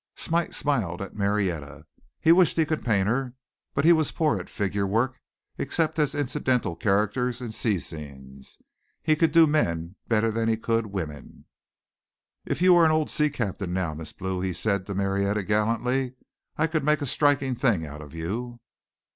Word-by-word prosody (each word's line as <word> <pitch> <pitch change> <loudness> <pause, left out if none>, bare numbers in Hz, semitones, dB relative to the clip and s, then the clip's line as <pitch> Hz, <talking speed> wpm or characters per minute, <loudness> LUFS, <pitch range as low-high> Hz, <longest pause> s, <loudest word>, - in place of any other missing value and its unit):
Smite 170 +1 -1
smiled 110 - -1
at 100 - -6
Marietta. 90 -8 -2 0.3
He 160 - +4
wished 175 -1 +4
he 160 - +4
could 155 0 -2
paint 100 -5 +2
her, 125 +2 -1 0.4
but 140 - +1
he 170 - +8
was 160 -3 +1
poor 155 -3 +1
at - - -9
figure 100 -2 -1
work 120 +6 0 0.4
except 160 -1 0
as 145 -2 +1
incidental 130 -8 0
characters 110 +6 0
in 120 -3 -5
sea 110 -2 0
scenes. 70 -5 -10 0.5
He 155 - +3
could 160 0 +2
do 165 +1 +7
men 85 - 0
better 115 0 +2
than 115 +1 0
he 110 - +2
could 115 0 0
women. 80 -8 -7 1.0
"If - - -1
you 185 -1 +7
were 170 -1 +6
an - - +5
old 155 -1 +1
sea 150 -1 +2
captain 100 -9 -3
now, 90 -4 -1
Miss 75 0 -7
Blue," 95 -1 -4
he 95 -1 -1
said 100 +1 -1
to 100 - -4
Marietta 100 +1 0
gallantly, 115 +5 0 0.4
"I 160 - +3
could 160 -2 -1
make 150 0 +2
a - - -1
striking 140 -1 +2
thing 115 - +1
out 75 0 -9
of 75 +1 -11
you." 120 +9 -4
115 Hz, 180 wpm, -26 LUFS, 95-145 Hz, 1.0 s, he